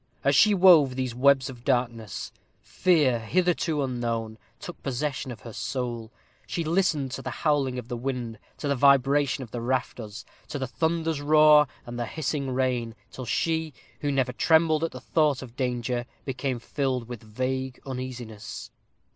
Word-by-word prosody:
As 140 0 +3
she 210 +8 +6
wove 170 -8 +6
these 130 -2 -2
webs 135 +1 +4
of 125 -3 -10
darkness, 120 -5 -1 0.3
fear, 150 -10 +2
hitherto 165 +3 +1
unknown, 115 -3 -3 0.2
took 175 - -9
possession 135 0 -3
of 120 - -9
her 115 - -9
soul. 120 -1 -4 0.4
She 170 - -2
listened 155 -5 +1
to - - -5
the - - -4 0.2
howling 140 -4 +2
of 125 -2 -6
the 125 - -4
wind 120 -3 -4 0.2
to 145 - -4
the 140 - +1
vibration 140 +1 +3
of 115 - -12
the 120 - -4
rafters 120 -3 -3 0.2
to - - -4
the 135 - -2
thunder's 160 +2 -1
roar, 150 0 +6 0.2
and 120 0 -7
to - - -1
the 120 - -2
hissing 145 -2 -2
rain 125 -3 -1 0.2
till 130 -1 -7
she, 160 +1 -1 0.2
who 145 - -1
never 135 -2 0
trembled 160 +2 +3
at 165 - +1
the 130 - -8
thought 150 -2 +1
of 120 -2 -12
danger, 125 -1 -2 0.2
became 135 -1 -2
filled 130 0 -2
with 120 -3 -7
vague 130 +3 -3
uneasiness. 125 -5 -7
130 Hz, 165 wpm, -26 LUFS, 120-150 Hz, 0.4 s, she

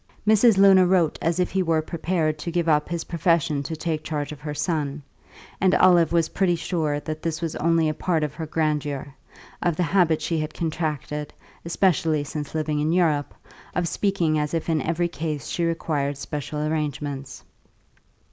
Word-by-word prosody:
Mrs. 220 0 +5
Luna 195 -2 +7
wrote 175 -4 +2
as 165 +2 0
if 180 - +1
he 190 - +1
were 165 -3 +1
prepared 160 -2 -1
to 170 - -4
give 170 -1 0
up 150 -2 +2
his 170 -1 -2
profession 165 -3 +1
to 150 +3 -4
take 155 -1 -3
charge 150 -2 -3
of 150 - -8
her 150 0 -5
son, 150 -2 -2 0.6
and 185 0 +4
Olive 175 -3 +5
was 165 -2 +2
pretty 185 -3 +1
sure 160 -4 -1
that 155 +1 -5
this 160 -1 -2
was 165 -2 -3
only 165 0 +2
a 155 - 0
part 160 0 0
of 150 -1 -2
her 160 0 -6
grandeur, 150 -3 -2 0.5
of 175 -2 +1
the 180 - 0
habit 170 -3 +3
she 160 +1 -1
had 155 0 -4
contracted, 150 -2 -3 0.3
especially 165 -3 +1
since 145 +1 -6
living 155 -1 -1
in 155 +2 +1
Europe, 160 -5 +1 0.4
of 175 -1 0
speaking 170 -5 +1
as 150 +2 -1
if 165 - -2
in 160 -2 +1
every 170 +1 0
case 155 -5 -4
she 170 - -1
required 150 -4 -1
special 150 +1 -4
arrangements. 145 -3 -3
160 Hz, 180 wpm, -24 LUFS, 150-170 Hz, 0.6 s, Luna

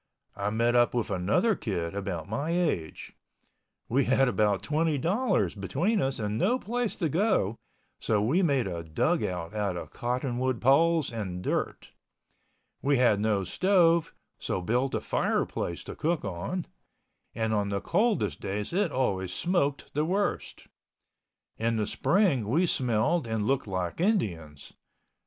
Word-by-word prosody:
I 100 0 -1
met 115 +3 +1
up 120 0 +3
with 115 -4 -1
another 100 - +2
kid 90 - -3
about 95 -5 -4
my 140 +10 -3
age. 170 - -2 0.7
We 130 +3 +2
had 135 +1 +3
about 105 -5 +1
$20.00 165 - 0
between 185 - 0
us 135 0 -1
and 105 -1 -2
no 240 - +2
place 240 -1 -2
to 170 - -1
go. 165 - +1 0.4
So 105 - +1
we 130 - +2
made 140 - +2
a 85 -3 -4
dugout 90 - -1
out 100 -4 -1
of - - -7
cottonwood 125 0 -1
poles 155 +2 +3
and 95 -5 -4
dirt. - - -2 0.9
We 140 0 +2
had 120 -5 +4
no 105 -2 +1
stove, 170 - +2 0.2
so - - -2
built 125 +8 0
a - - -1
fireplace 85 - -1
to - - -8
cook 165 -3 -1
on—and 110 - -6
on 105 -1 0
the 100 0 -1
coldest 210 - 0
days 105 +7 -3
it 190 -3 +1
always 95 -9 -1
smoked 145 - -1
the 150 - +1
worst. 195 +5 -2 0.9
In 115 +1 +1
the 105 - 0
spring 150 - +1
we 160 +11 +2
smelled 125 +1 +1
and 110 -2 -1
looked 135 -1 0
like 95 - -3
Indians. 85 - -1
120 Hz, 145 wpm, -28 LUFS, 100-165 Hz, 0.9 s, had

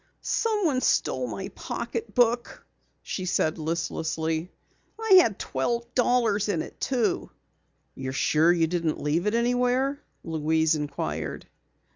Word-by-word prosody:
"Someone 400 - +1
stole - - +1
my - - -5
pocketbook," 245 - -1 0.4
she 185 - -4
said 160 -3 0
listlessly. 160 +1 -2 0.5
"I 425 -4 +7
had 220 - 0
twelve 235 - -2
dollars 235 -5 +2
in 170 -6 0
it, - - -12
too." 245 -5 0 0.6
"You're 130 - -5
sure 155 +4 +3
you 170 -2 +3
didn't 165 -1 -1
leave 160 +6 0
it 210 - +1
anywhere?" 250 +4 +1 0.2
Louise 160 0 +1
inquired. 80 - -3
185 Hz, 115 wpm, -26 LUFS, 160-245 Hz, 0.6 s, I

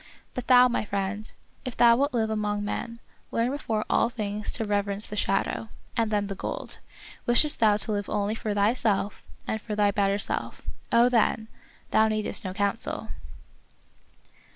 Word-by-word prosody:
But 250 -1 -5
thou, 250 0 +8
my 240 - 0
friend, 200 +1 -3 0.3
if 255 - -5
thou 235 -1 +7
wilt 280 +4 +1
live 220 -2 +1
among 210 -1 -1
men, 230 +3 -4 0.3
learn 235 +2 +1
before 225 -7 -2
all - - +3
things 210 -3 -4
to 225 - -1
rev 205 -1 +1
erence 200 +1 -2
the 210 - -6
shadow, 205 +2 0 0.3
and 225 -2 +1
then 205 -1 +1
the 200 - -4
gold. 195 - -5 0.5
Wishest 265 +5 +4
thou 215 -2 +5
to 215 - -3
live 205 -1 -2
only 205 0 0
for 215 -2 -3
thyself 205 -1 +1 0.2
and 220 - -2
for 210 -1 -4
thy 205 -1 +3
better 200 0 +1
self 205 - -3
— - - -32
oh, 235 +1 +6
then! 225 -2 +2 0.2
— - - -30
thou 220 0 +5
needest 215 -1 -1
no 185 - -3
counsel. 200 +1 -1
215 Hz, 175 wpm, -27 LUFS, 205-230 Hz, 0.5 s, thou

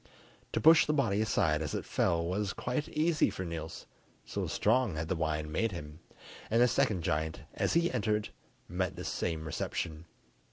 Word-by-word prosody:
To - - +1
push 160 +1 +7
the 150 - +2
body 110 -8 +2
aside 80 -7 +2
as 75 - -3
it - - -3
fell 85 -1 +1
was 95 +2 -1
quite 125 +5 -2
easy 155 0 +2
for 95 - -5
Niels, 80 -2 -6 0.4
so - - -3
strong 115 -3 +2
had 80 +1 -3
the 95 - +1
wine 80 -1 -1
made 115 +6 0
him, 75 -2 -8 0.5
and 115 - +3
the 125 - +6
second 100 -6 +1
giant 80 +1 -1
as - - 0
he 170 +1 +3
entered 105 0 0 0.4
met 90 -1 -2
the - - -6
same 80 -2 -2
reception. 80 +1 -3
90 Hz, 175 wpm, -31 LUFS, 80-115 Hz, 0.5 s, push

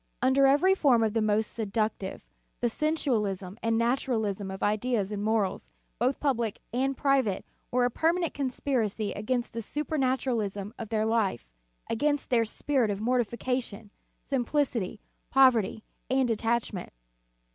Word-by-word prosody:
Under 265 +2 +4
every 295 +8 +5
form 250 -11 +4
the 225 - +1
most 215 +1 +1
seductive, 215 -3 -2 0.3
the 240 - +1
sensualism 220 - -1
and 225 0 +1
naturalism 225 -5 0
of 190 0 -5
ideas 210 -1 0
and 205 -1 -3
morals, 215 -3 0 0.3
both 255 +4 +1
public 235 -7 0 0.2
and 265 +2 0
private, 270 -8 +1 0.2
were 250 0 +2
a 245 - +1
permanent 335 +5 +1
conspiracy 250 -6 -1
against 240 +4 -2
the 230 - -3
supernaturalism 255 -7 -1
of 225 -3 -6
their 220 -1 +1
life, 220 - 0 0.4
against 290 +5 0
their 230 -2 +4
spirit 250 +1 0
of 200 -1 -2
mortification, 235 -2 -1 0.3
simplicity, 250 -6 -1 0.3
poverty, 240 -5 +4 0.3
and 260 -1 +2
detachment. 225 -4 -1
235 Hz, 125 wpm, -28 LUFS, 215-265 Hz, 0.4 s, every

